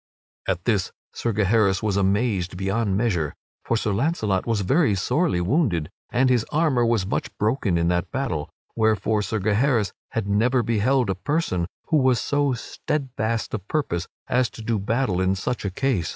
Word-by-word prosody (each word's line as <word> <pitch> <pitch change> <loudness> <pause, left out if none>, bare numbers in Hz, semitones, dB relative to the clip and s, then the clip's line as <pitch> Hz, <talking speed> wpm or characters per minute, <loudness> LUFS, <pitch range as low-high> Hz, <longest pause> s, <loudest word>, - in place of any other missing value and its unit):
At - - -1
this - - +1 0.2
Sir 115 - -1
Gaheris 105 -2 +2
was 105 -3 +1
amazed 100 -2 +1
beyond 95 +1 0
measure, 90 -10 0 0.3
for 115 - 0
Sir 110 - -1
Launcelot 110 - 0
was 115 -3 +1
very 135 - +3
sorely 145 - +1
wounded, 90 - +1 0.2
and 130 +2 +2
his 125 -3 +3
armor 150 -6 +2
was 115 -5 +2
much 95 - -2
broken 105 -4 +1
in 85 0 +1
that 90 0 0
battle, 90 - -2 0.3
wherefore 110 -1 +2
Sir 110 +2 -2
Gaheris 110 +2 +1 0.2
had 110 -3 -1
never 120 +5 +2
beheld 115 +1 +2
a - - +1
person 95 - -1 0.2
who 160 - +4
was 130 -4 +3
so 145 -2 +1
steadfast 120 -3 -3
of 105 -2 -4
purpose 95 - -1 0.2
as 125 -1 +2
to 115 - -10
do 110 -1 0
battle 105 -2 0
in 95 +1 +2
such 110 +4 -3
a - - +1
case. 95 -5 0
110 Hz, 170 wpm, -24 LUFS, 95-125 Hz, 0.3 s, who